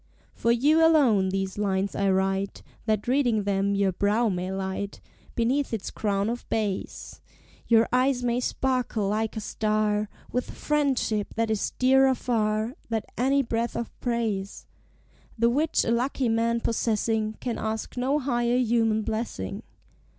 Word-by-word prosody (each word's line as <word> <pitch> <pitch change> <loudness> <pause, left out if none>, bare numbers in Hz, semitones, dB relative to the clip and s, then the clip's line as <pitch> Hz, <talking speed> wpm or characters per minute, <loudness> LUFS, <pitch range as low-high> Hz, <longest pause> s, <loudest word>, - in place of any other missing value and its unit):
For 235 - +1
you 295 +7 +4
alone 255 -13 +4
these 195 +1 -2
lines 195 -1 0
I 200 0 +1
write, 195 +1 0 0.2
That, 215 0 0
reading 245 -5 +2
them, 200 0 0
your 200 -1 +2
brow 210 +5 +1
may 185 -1 -2
light 190 +1 -4 0.4
Beneath 255 +5 +1
its 205 - -6
crown 200 -1 -1
of 240 +2 -4
bays; 210 -4 -3 0.5
Your 230 -1 +5
eyes 255 0 +2
may 240 0 +1
sparkle 250 -5 -1
like 220 +1 -1
a - - 0
star, 215 -1 0 0.2
With 250 - -2
friendship, 270 -8 -1
that 225 0 0
is 215 - -1
dearer 265 +1 +4
far 220 -1 0 0.2
Than 225 -2 -1
any 275 +3 +2
breath 230 0 -2
of 235 - -3
praise; 225 -5 -2 0.7
The 235 +1 +3
which 305 +5 +1
a 230 - +1
lucky 250 +1 0
man 230 +1 +1
possessing 220 -1 0
Can 240 -3 -3
ask 220 0 -3
no 260 +4 +1
higher 240 -3 +1
human 225 -3 +2
blessing. 215 - -4
225 Hz, 145 wpm, -26 LUFS, 205-245 Hz, 0.7 s, Your